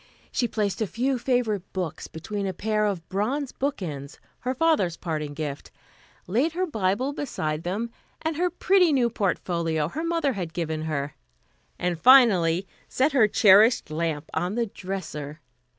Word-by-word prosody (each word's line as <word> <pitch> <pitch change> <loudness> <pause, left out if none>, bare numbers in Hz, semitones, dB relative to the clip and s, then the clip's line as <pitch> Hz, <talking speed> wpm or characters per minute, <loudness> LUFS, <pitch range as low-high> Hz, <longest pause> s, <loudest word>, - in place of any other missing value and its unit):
She 240 - 0
placed 210 -2 -2
a 215 - +1
few 255 +5 -1
favorite 235 -6 0
books 180 -4 -4
between 200 +5 -4
a 190 - -2
pair 215 +1 0
of 180 -5 -3
bronze 255 +8 -1
bookends, 165 - -4 0.2
her 255 +1 -2
father's 270 - +2
parting 150 -4 -4
gift; 145 -2 -5 0.6
laid 255 - +1
her 365 +2 0
Bible 225 - 0
beside 155 - -3
them, 205 +7 -3 0.3
and 320 0 -2
her 355 +3 +1
pretty 360 0 +3
new 245 -4 +2
portfolio 170 -7 -1
her 315 - -4
mother 335 -5 0
had 175 -6 -5
given 160 -3 -3
her; 145 -2 -2 0.6
and 175 -2 -1
finally 195 -9 +6 0.2
set 270 +4 +2
her 250 -6 +5
cherished 210 -1 +5
lamp 155 -1 -2
on 180 +4 -1
the 235 -1 +1
dresser. 170 -7 -6
200 Hz, 150 wpm, -25 LUFS, 165-255 Hz, 0.6 s, finally